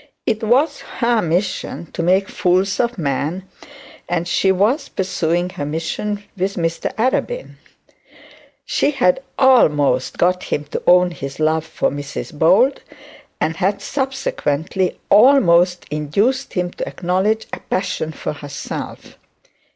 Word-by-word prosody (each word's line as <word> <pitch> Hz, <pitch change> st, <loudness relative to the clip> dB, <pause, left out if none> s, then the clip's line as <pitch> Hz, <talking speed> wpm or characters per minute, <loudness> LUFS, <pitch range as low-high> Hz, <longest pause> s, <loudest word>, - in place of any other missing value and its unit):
It 220 Hz, -2 st, 0 dB
was 270 Hz, +7 st, +2 dB, 0.2 s
her 235 Hz, -2 st, +2 dB
mission 170 Hz, -1 st, -2 dB
to -, -, -4 dB
make 190 Hz, +3 st, +2 dB
fools 185 Hz, +3 st, +1 dB
of 235 Hz, -1 st, 0 dB
men, 155 Hz, +4 st, -2 dB, 0.6 s
and 175 Hz, 0 st, -1 dB
she 190 Hz, +2 st, +2 dB
was 215 Hz, +10 st, +1 dB
pursuing 180 Hz, -1 st, -1 dB
her 145 Hz, -, -5 dB
mission 165 Hz, +7 st, -3 dB
with 195 Hz, +1 st, -2 dB
Mr 165 Hz, -1 st, -2 dB
Arabin. 260 Hz, -, -1 dB, 1.1 s
She -, -, +1 dB
had 265 Hz, -4 st, +2 dB, 0.2 s
almost 150 Hz, -, +3 dB
got 180 Hz, +1 st, +1 dB
him 145 Hz, -, -2 dB
to -, -, -3 dB
own 180 Hz, 0 st, +5 dB
his 140 Hz, -4 st, -7 dB
love 160 Hz, +1 st, +1 dB
for -, -, -1 dB
Mrs 145 Hz, +3 st, -6 dB
Bold, 190 Hz, -, +3 dB, 0.6 s
and 160 Hz, +1 st, -1 dB
had 195 Hz, +2 st, 0 dB
subsequently 190 Hz, -, -2 dB
almost 180 Hz, -7 st, +5 dB
induced 200 Hz, -, 0 dB
him 180 Hz, -1 st, -1 dB
to -, -, -5 dB
acknowledge 190 Hz, +5 st, 0 dB
a -, -, -4 dB
passion 180 Hz, -4 st, -2 dB
for 150 Hz, -, -5 dB
herself. 145 Hz, -1 st, -7 dB
180 Hz, 130 wpm, -19 LUFS, 160-215 Hz, 1.1 s, own